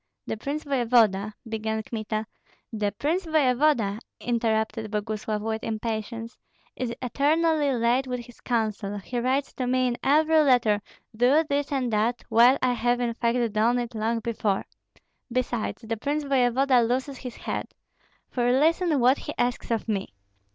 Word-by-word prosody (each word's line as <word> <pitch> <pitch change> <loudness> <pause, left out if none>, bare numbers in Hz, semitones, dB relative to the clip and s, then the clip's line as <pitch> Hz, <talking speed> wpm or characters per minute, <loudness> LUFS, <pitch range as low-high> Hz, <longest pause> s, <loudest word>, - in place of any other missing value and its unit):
"The - - -3
prince 280 +7 -4
voevoda 230 -7 +2
" - - -18
began 220 0 -2
Kmita. 215 -1 -3 0.5
"The 210 -2 0
prince 330 - -1
voevoda," 265 -8 +2 0.2
interrupted 225 -2 -1
Boguslav, 210 0 -3
with 220 0 -3
impatience, 225 +1 -4 0.4
"is 250 -2 -3
eternally 300 +3 +2
late 245 +2 +1
with 250 -1 -3
his 240 0 -16
counsel; 215 -4 -1
he 240 +5 -4
writes 265 +3 0
to 255 - -3
me 255 0 +2
in 240 - -3
every 315 +3 +4
letter, 245 -8 +3 0.3
'Do 255 +7 +4
this 285 0 -1
and 260 -4 0
do 215 - +1
that,' 235 +3 0
while 245 +4 +6
I 250 -1 +3
have 240 +1 +1
in 240 -1 0
fact 235 -1 0
done 225 +3 +3
it 240 -1 -3
long 225 +1 -1
before. 215 -4 -1 0.7
Besides, 240 -2 -2
the 225 0 -2
prince 290 +6 -1
voevoda 260 -1 +3
loses 255 +3 -1
his 250 -3 -7
head. - - -4 0.6
For 245 -1 +1
listen 315 +3 +3
what 255 +3 +4
he 295 - -6
asks 245 0 -1
of 230 -2 -1
me." 195 - -3
240 Hz, 160 wpm, -26 LUFS, 220-265 Hz, 0.7 s, while